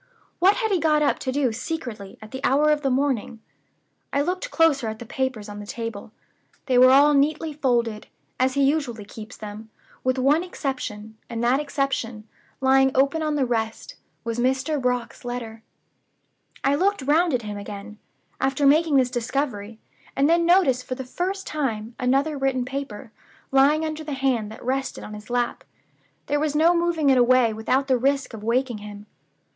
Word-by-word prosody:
What 385 +4 +5
had 440 -3 -1
he 375 - +2
got 305 -2 +3
up 290 - +1
to 260 - -2
do 265 -2 +1
secretly, 225 - -6
at 215 - -12
that 260 +1 -7
hour 295 +3 +3
of 300 -1 +1
the 275 - 0
morning? 255 -4 -1 0.7
I 280 - +1
looked 365 +10 -2
closer 315 - +2
at 220 0 -4
the 235 - -9
papers 250 -3 -3
on 205 0 -8
the 205 - -9
table. 230 -2 -6 0.5
They 255 -2 +3
were 255 +1 +8
all 285 +3 +6
neatly 300 +2 +1
folded 235 -6 0 0.3
(as 260 +1 +2
he 280 - +3
usually 270 -7 0
keeps 220 +3 -10
them), 215 +1 -9 0.3
with 255 0 +1
one 285 +6 +3
exception; 220 -10 -5
and 230 -1 -3
that 250 +3 +3
exception, 275 -7 -2 0.3
lying 265 0 +5
open 275 +4 +2
on 305 -1 0
the 275 -3 +1
rest, 225 -2 -3 0.3
was 230 0 -3
Mr. 265 +4 0
Brock's 250 -2 -2
letter. 235 -2 -6 1.0
"I 275 - +3
looked 380 +1 +1
round 320 +5 +3
at 240 - -2
him 210 -1 -5
again, 205 +1 -9 0.4
after 270 +2 +1
making 305 +2 +4
this 255 -2 +3
discovery, 240 -4 -3 0.4
and 275 +1 +3
then 335 +1 +3
noticed 300 -9 +4
for 255 - -4
the 265 0 -6
first 375 +9 -3
time 235 -7 -3
another 275 +4 +1
written 265 -2 0
paper, 265 -3 -6 0.4
lying 285 +4 +4
under 310 0 -4
the 300 -1 -5
hand 260 -6 0
that 220 - -11
rested 265 +1 -2
on 210 - -8
his 210 +2 -10
lap. 245 0 -1 0.6
There 290 +1 0
was 300 -1 -1
no 330 +3 +4
moving 335 -4 +2
it 260 - +4
away 245 -2 +4
without 255 +5 0
the 260 -2 +2
risk 275 0 0
of 215 -2 -8
waking 240 0 0
him. 205 0 -10
265 Hz, 180 wpm, -24 LUFS, 230-290 Hz, 1.0 s, were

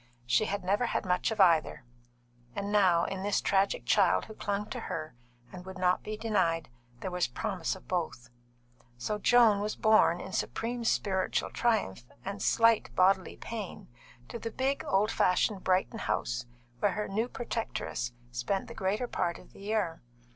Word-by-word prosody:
She 125 - +3
had 200 -2 -3
never 205 +6 +1
had - - -1
much 180 -1 +1
of 220 - -4
either, 165 -8 +4 0.7
and 200 0 -3
now, 185 -5 +4
in 195 -1 -4
this 205 +1 +1
tragic 195 0 +1
child - - +3
who 220 - -10
clung 205 0 -2
to - - -3
her 155 -1 -5 0.4
and 180 -1 -8
would 190 +1 -9
not 180 0 +2
be 215 0 -5
denied, 170 - 0 0.3
there 190 - -3
was 180 0 +1
promise 170 - -2
of 190 - -15
both. 145 -9 -3 0.7
So 210 - -2
Joan 225 -2 +5
was 210 +1 -2
borne 215 -5 +4
in 190 - -7
supreme 240 +1 -2
spiritual 190 -4 0
triumph 215 - 0 0.2
and 200 +1 -5
slight 230 -1 +4
bodily 185 0 +3
pain 215 -5 -7 0.4
to 235 - -6
the 230 - -4
big, 265 +4 -1
old 200 +3 +2
fashioned 185 +2 +2
Brighton 185 0 +1
house - - -2 0.3
where - - +2
her 210 0 -2
new 220 +4 -1
protectress 225 - -3 0.2
spent 120 +12 -2
the - - -8
greater 205 +6 -1
part 170 -6 -1
of - - -17
the - - -15
year. 200 -5 -1
195 Hz, 170 wpm, -30 LUFS, 180-215 Hz, 0.7 s, Joan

